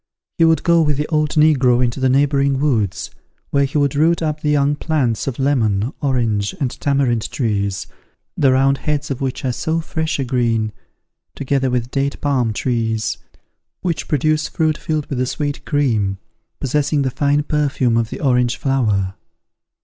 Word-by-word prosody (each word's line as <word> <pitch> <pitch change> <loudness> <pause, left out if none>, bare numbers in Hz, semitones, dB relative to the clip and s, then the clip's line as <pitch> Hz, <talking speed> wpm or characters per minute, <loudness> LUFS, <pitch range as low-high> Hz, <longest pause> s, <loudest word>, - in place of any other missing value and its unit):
He 165 - +6
would 160 -2 +3
go 170 -1 +4
with 150 -3 +1
the 150 - -1
old 155 -2 +1
negro 135 -6 +4
into 120 +3 -3
the 130 0 +2
neighbouring 140 0 +2
woods, 115 -10 0 0.4
where 140 0 +3
he 145 +3 -2
would 145 -2 +2
root 165 +3 +2
up 155 -1 -2
the 150 - 0
young 145 0 +2
plants 135 -9 -1
of 130 - -3
lemon, 120 -4 +1
orange, 115 -8 0
and 130 -4 -1
tamarind 135 -6 0
trees, 100 -6 -1 0.5
the 135 -2 +3
round 135 +1 +3
heads 150 +1 -2
of 135 - -4
which 135 0 -3
are 130 - +1
so 160 +5 -1
fresh 160 -1 -2
a 135 - -1
green, 115 -4 0 0.6
together 135 -1 0
with 125 0 -2
date 140 0 -1
palm 130 -6 +1
trees, 115 -1 -1 0.6
which 170 -3 -2
produce 155 +1 +1
fruit 155 -1 0
filled 155 -1 -2
with 130 -3 -3
a 130 - 0
sweet 145 +1 -3
cream, 110 -10 0 0.4
possessing 145 +1 0
the 130 - -1
fine 145 +2 +1
perfume 140 -5 0
of 115 -1 +1
the - - -7
orange 125 -3 +2
flower. 105 -9 0
135 Hz, 170 wpm, -19 LUFS, 120-150 Hz, 0.6 s, He